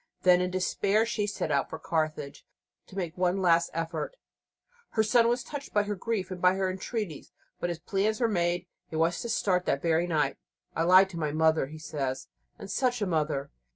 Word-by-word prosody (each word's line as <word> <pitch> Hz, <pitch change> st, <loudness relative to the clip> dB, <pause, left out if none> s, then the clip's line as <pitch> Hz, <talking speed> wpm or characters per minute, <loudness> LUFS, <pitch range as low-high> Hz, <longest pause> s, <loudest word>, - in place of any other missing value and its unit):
Then, 180 Hz, -1 st, +6 dB
in 180 Hz, -, 0 dB
despair, 195 Hz, +3 st, +1 dB
she 215 Hz, -3 st, -1 dB
set 200 Hz, -6 st, -2 dB
out 140 Hz, -1 st, +1 dB
for -, -, -5 dB
Carthage 155 Hz, -3 st, -2 dB, 0.4 s
to -, -, -14 dB
make 175 Hz, -3 st, -3 dB
one 180 Hz, +1 st, +1 dB
last 170 Hz, -2 st, +3 dB
effort. 165 Hz, -, -3 dB, 0.8 s
Her 220 Hz, -, +3 dB
son 230 Hz, +2 st, +4 dB
was 240 Hz, +2 st, +1 dB
touched 285 Hz, -5 st, -8 dB
by 205 Hz, -, +4 dB
her 205 Hz, 0 st, -2 dB
grief 200 Hz, -1 st, -3 dB
and 180 Hz, -1 st, -6 dB
her 185 Hz, +1 st, +3 dB
entreaties, 190 Hz, -, -5 dB, 0.3 s
but 175 Hz, -, -1 dB
his 170 Hz, -, -3 dB
plans 200 Hz, +5 st, 0 dB
were 235 Hz, -, +3 dB
made: 175 Hz, -3 st, 0 dB, 0.2 s
he -, -, -7 dB
was 165 Hz, +2 st, +1 dB
to 235 Hz, -, -4 dB
start 185 Hz, -5 st, +1 dB
that 140 Hz, -, 0 dB
very 165 Hz, +1 st, +2 dB
night. 150 Hz, -5 st, +1 dB, 0.4 s
"I 165 Hz, -, +1 dB
lied 185 Hz, +2 st, +6 dB
to 170 Hz, -, -6 dB
my 150 Hz, -2 st, -1 dB
mother," 160 Hz, -2 st, +2 dB
he 155 Hz, +3 st, -9 dB
says, 140 Hz, -4 st, -4 dB, 0.3 s
"and 195 Hz, -, -8 dB
such 245 Hz, +2 st, +1 dB
a -, -, +1 dB
mother!" 155 Hz, -5 st, -1 dB
180 Hz, 200 wpm, -28 LUFS, 160-205 Hz, 0.8 s, Then